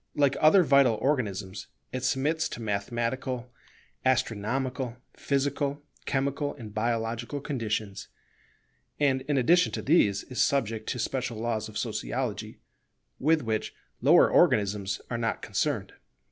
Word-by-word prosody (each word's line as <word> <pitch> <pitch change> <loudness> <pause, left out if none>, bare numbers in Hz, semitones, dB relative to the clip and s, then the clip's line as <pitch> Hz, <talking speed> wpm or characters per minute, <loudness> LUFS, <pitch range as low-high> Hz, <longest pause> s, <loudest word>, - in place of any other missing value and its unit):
Like 140 -2 +3
other 180 +5 +7
vital 140 -6 +5
organisms, 105 -7 -2 0.3
it 130 -1 -3
submits 145 +5 +1
to - - -7
mathematical, 120 +4 -2 0.5
astronomical, 125 +1 -1 0.2
physical, 140 +1 -1 0.2
chemical, 140 +1 -1
and 110 -3 -10
biological 115 +4 -2
conditions; 110 -7 -3 0.9
and, 135 -3 +2
in 145 -2 +1
addition 175 +8 +4
to - - -2
these, 105 - +3
is 125 - -3
subject 115 -5 0
to - - -2
special 125 -1 -2
laws 110 -1 -2
of 105 - -7
Sociology - - -3 0.6
with 155 +2 +3
which 110 -1 -2 0.3
lower - - +6
organisms 100 -1 +2
are 120 - -1
not 115 -2 -2
concerned. - - -1
125 Hz, 120 wpm, -28 LUFS, 110-140 Hz, 0.9 s, other